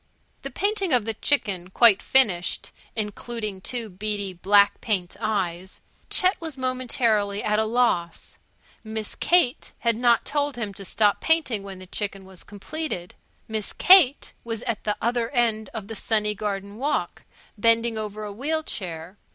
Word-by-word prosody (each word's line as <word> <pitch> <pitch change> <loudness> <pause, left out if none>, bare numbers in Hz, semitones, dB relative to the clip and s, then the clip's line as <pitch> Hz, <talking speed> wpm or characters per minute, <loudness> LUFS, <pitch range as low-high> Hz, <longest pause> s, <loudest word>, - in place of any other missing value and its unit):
The 275 - -6
painting 395 - -1
of 240 -4 +3
the 225 - -1
chicken 200 -8 -1
quite 215 0 +5
finished 200 -10 +2 0.2
(including 215 -1 -4
two 235 +2 -4
beady 200 0 -3
black 200 +3 +4
paint 190 -6 -2
eyes) 190 -4 -2 0.3
Chet 370 0 +3
was 320 -4 -5
momentarily 235 -5 0
at 210 0 +1
a 220 - +2
loss. 215 -8 0 0.4
Miss 220 -1 -4
Kate 345 -8 +2
had 235 -1 +1
not 235 0 +3
told 290 -1 -1
him 215 -4 -4
to 195 - -7
stop 205 +1 +2
painting 310 -10 +1
when 195 -1 -8
the 185 - -10
chicken 195 0 -4
was 190 -2 -13
completed. 205 - -6 0.3
Miss 220 -2 -2
Kate 345 -7 +6
was 230 -1 -4
at 230 -4 -3
the 210 -1 0
other 235 0 0
end 225 -5 0
of 215 -3 -7
the 225 - -6
sunny 210 -1 0
garden 200 0 -4
walk, 290 +4 -2 0.3
bending 230 +1 +3
over 215 -1 -5
a 205 -1 -6
wheel 310 +8 -1
chair. 175 - -6
215 Hz, 155 wpm, -24 LUFS, 200-245 Hz, 0.4 s, Kate